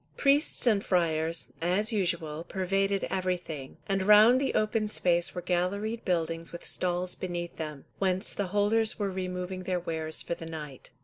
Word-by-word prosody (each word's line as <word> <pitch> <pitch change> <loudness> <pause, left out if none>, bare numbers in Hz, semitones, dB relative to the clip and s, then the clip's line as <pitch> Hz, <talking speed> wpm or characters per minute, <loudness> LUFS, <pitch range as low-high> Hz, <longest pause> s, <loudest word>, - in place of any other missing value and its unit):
Priests 285 +1 +2
and 210 -4 +3
friars, 165 -2 0
as 195 +6 +1
usual, 170 -6 -1
pervaded 195 +2 0
everything, 180 -7 -3
and 195 -1 +1
round 210 +6 +7
the 275 - 0
open 215 0 +1
space 175 -4 +1
were 180 - -4
galleried 200 +6 -1
buildings 165 -2 -1
with 170 - -8
stalls 180 0 -1
beneath 175 -2 -5
them, 150 -3 -6
whence 190 +1 0
the 200 - -2
holders 210 +3 +2
were 200 -3 -1
removing 185 0 -4
their 185 -1 -1
wares 160 -2 -2
for - - -2
the 165 -1 -7
night. 150 -5 -8
180 Hz, 160 wpm, -29 LUFS, 170-205 Hz, -, round